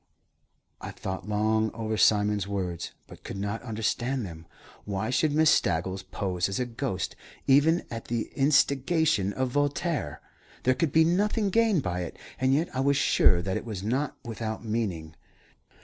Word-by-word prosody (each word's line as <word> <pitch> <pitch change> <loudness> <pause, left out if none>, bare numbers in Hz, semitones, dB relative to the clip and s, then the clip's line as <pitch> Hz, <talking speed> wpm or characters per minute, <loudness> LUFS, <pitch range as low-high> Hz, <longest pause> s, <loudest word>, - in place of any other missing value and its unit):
I - - -6
thought 95 +2 -6
long 110 +1 +2
over 110 -1 -2
Simon's 105 -2 +3
words, 90 -4 -3 0.2
but - - -14
could - - -6
not 105 +3 -3
understand 120 +2 -2
them. 80 -2 -10 0.4
Why 105 +3 -2
should 145 +4 +2
Miss 155 +1 +4
Staggles 95 +3 +1
pose 90 -2 -2
as 95 - -2
a 125 - 0
ghost, 120 -4 -3 0.3
even 150 +5 +4
at 115 -1 -5
the 115 -1 -3
instigation 140 - +2
of 130 +3 -1
Voltaire? 145 - -1 0.4
There 130 - +4
could 145 +3 0
be 160 +1 +5
nothing 205 +4 +1
gained 220 - +3
by 90 0 -2
it, 90 -2 -5 0.2
and 130 0 +2
yet 150 +2 0
I - - -1
was 140 +1 +3
sure 90 -9 +4
that 95 +1 -1
it - - -5
was 105 -5 -6
not 130 +7 -1
without 110 -1 -5
meaning. 95 -8 -3
115 Hz, 165 wpm, -27 LUFS, 100-140 Hz, 0.4 s, be